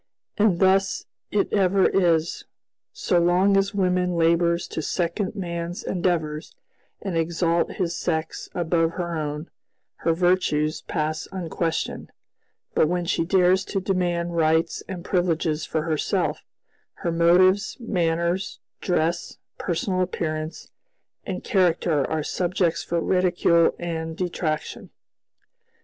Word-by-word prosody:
And 205 -5 +3
thus 195 +1 +2 0.2
it 205 - 0
ever 195 -1 +3
is: 170 -3 +1 0.5
so 175 - +1
long 180 +3 +3
as 195 +1 +1
woman 180 -2 +1
labors 170 +1 +2
to - - -3
second 180 +5 -2
man's 170 -2 -4
endeavors 165 -4 -2 0.5
and 195 -4 -3
exalt 165 +1 +1
his 175 -4 -2
sex 160 -2 -3
above 165 -1 +1
her 170 -1 -3
own, 150 +1 -4 0.5
her 165 - +1
virtues 165 -3 +1
pass 155 0 -3
unquestioned; 170 -3 -3 0.6
but - - +3
when 175 +1 -1
she 165 - +1
dares 185 +1 +3
to 195 - -2
demand 175 -2 -1
rights 160 0 +2
and 180 -2 -6
privileges 165 -3 0
for 160 -1 -1
herself, 155 -2 -1 0.6
her 170 - +2
motives, 185 +4 +4
manners, 175 -3 -1 0.2
dress, 170 -2 -1 0.2
personal 185 +2 -1
appearance, 155 -3 -3 0.6
and 190 -3 -4
character 170 -5 +2
are 160 -1 -1
subjects 175 0 0
for 170 - -1
ridicule 175 -1 +3
and 160 -1 -4
detraction. 170 -4 -3
170 Hz, 115 wpm, -24 LUFS, 165-185 Hz, 0.6 s, motives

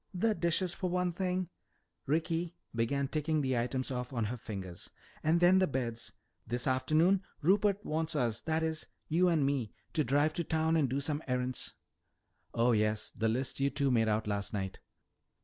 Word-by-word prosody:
"The 220 +5 +2
dishes, 175 -1 0
for 185 - -2
one 180 0 0
thing," 185 0 -1 0.6
Ricky 165 +3 0 0.2
began 135 +4 0
ticking 155 +1 0
the 130 -2 0
items 125 +3 -1
off 125 0 -3
on 115 -4 -1
her 115 +4 -2
fingers, 95 -6 -7 0.3
"and 160 +2 +3
then 180 +2 +6
the 185 - +3
beds. 120 -4 -3 0.4
This 120 +1 -2
afternoon 155 +9 +3 0.2
Rupert 200 +3 +3
wants 160 +1 -1
us 120 -6 0
that 160 0 0
is, 160 -1 -2 0.2
you 175 +4 +4
and 160 -5 +3
me 135 -6 -1 0.2
to 155 - +2
drive 145 +3 +2
to 170 - -1
town 160 +1 +1
and 150 -5 +3
do 135 +3 -1
some 150 +1 -1
errands." 125 0 -2 0.8
"Oh, 120 +2 +3
yes, 110 -1 +1
the 110 0 0
list 125 +4 -1
you 140 0 +3
two 140 -1 +1
made 115 -2 +3
out 110 0 +1
last 100 0 -2
night. 95 -2 -3
140 Hz, 180 wpm, -32 LUFS, 120-165 Hz, 0.8 s, then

